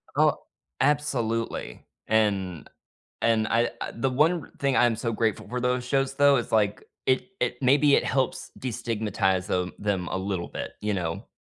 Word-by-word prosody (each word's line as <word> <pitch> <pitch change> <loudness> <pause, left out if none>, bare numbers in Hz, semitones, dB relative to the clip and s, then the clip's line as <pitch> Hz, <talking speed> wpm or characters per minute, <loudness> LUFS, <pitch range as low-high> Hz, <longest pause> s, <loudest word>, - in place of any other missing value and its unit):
Oh, - - +4 0.4
absolutely, 120 -6 -1 0.2
and 100 -6 0 0.5
and 115 -1 +3
I 115 +1 +2 0.2
the 130 +3 0
one 155 +5 +1
thing 140 -2 +1
I'm 120 -2 +4
so 115 0 -2
grateful 110 -2 -1
for 125 +2 -3
those 125 0 0
shows 135 +1 0
though, 140 0 +5
is 120 -2 -3
like, 105 -2 +1 0.2
it 130 +7 +2
it 125 - 0
maybe 140 +2 +5
it - - +3
helps 130 -1 -1
destigmatize 105 -6 -1
the 90 0 -1
them 100 -4 -1
a - - -2
little 95 -2 -3
bit, - - -6
you 105 0 -1
know? 85 -4 -3
115 Hz, 160 wpm, -26 LUFS, 105-130 Hz, 0.5 s, though